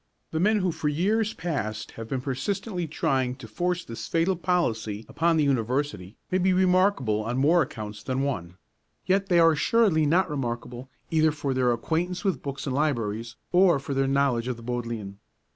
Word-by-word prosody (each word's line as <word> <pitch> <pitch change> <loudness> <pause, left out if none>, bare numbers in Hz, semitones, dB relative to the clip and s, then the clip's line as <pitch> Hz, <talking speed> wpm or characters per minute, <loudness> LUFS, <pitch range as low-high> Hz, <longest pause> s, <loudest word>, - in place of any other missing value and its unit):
The 160 - -1
men 210 +3 +3
who 185 -1 +1
for 160 -2 -2
years 210 +8 +1
past 110 -11 -3
have 115 -1 -8
been 130 +1 -2
persistently 170 - -3
trying 130 -4 0
to 130 -3 -11
force 175 +9 -2
this 115 - -7
fatal 170 +3 +1
policy 115 - -1
upon 165 +4 +1
the 155 - +3
University 125 -6 -1
may 185 - +2
be 185 +1 +3
remarkable 180 - +2
on 120 +3 -2
more 160 +6 +4
accounts 105 -6 -5
than 130 +1 -2
one; 90 -11 -3 0.5
yet 195 +1 +1
they 175 - +4
are 165 -1 +6
assuredly 160 -1 +3
not 180 +5 +3
remarkable 125 -3 -4 0.2
either 160 -1 +4
for 145 -2 -2
their 125 -1 +2
acquaintance 170 +9 -1
with 195 - 0
books 140 -1 -5
and 130 -3 -2
libraries, 115 -6 -1 0.2
or 180 -3 +5
for 140 +1 -5
their 135 0 +1
knowledge 135 -3 +1
of 125 -2 -2
the 115 - -12
Bodleian. 115 -5 -4
140 Hz, 180 wpm, -26 LUFS, 120-175 Hz, 0.5 s, are